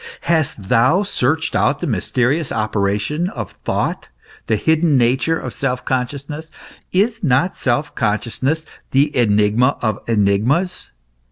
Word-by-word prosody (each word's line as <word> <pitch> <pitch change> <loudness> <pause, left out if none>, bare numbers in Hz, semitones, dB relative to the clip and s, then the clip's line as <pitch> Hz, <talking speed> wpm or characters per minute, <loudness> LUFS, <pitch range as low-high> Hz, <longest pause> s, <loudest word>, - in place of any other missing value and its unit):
Hast 155 - 0
thou 130 - +4
searched 160 -4 -1
out - - +2
the - - -3
mysterious 135 +5 0
operation 110 - -1
of - - -6
thought, - - -2 0.4
the - - +2
hidden 160 -2 +2
nature 130 +7 +2
of 125 - -6
self 125 0 -2
consciousness? 140 +5 -3 0.4
Is 215 +4 +1
not 145 +5 +2
self 145 +3 -1
consciousness 125 +8 -1 0.3
the 145 +3 +2
enigma 110 +2 +3
of 110 -3 -1
enigmas 115 - +1
130 Hz, 120 wpm, -19 LUFS, 115-160 Hz, 0.4 s, thou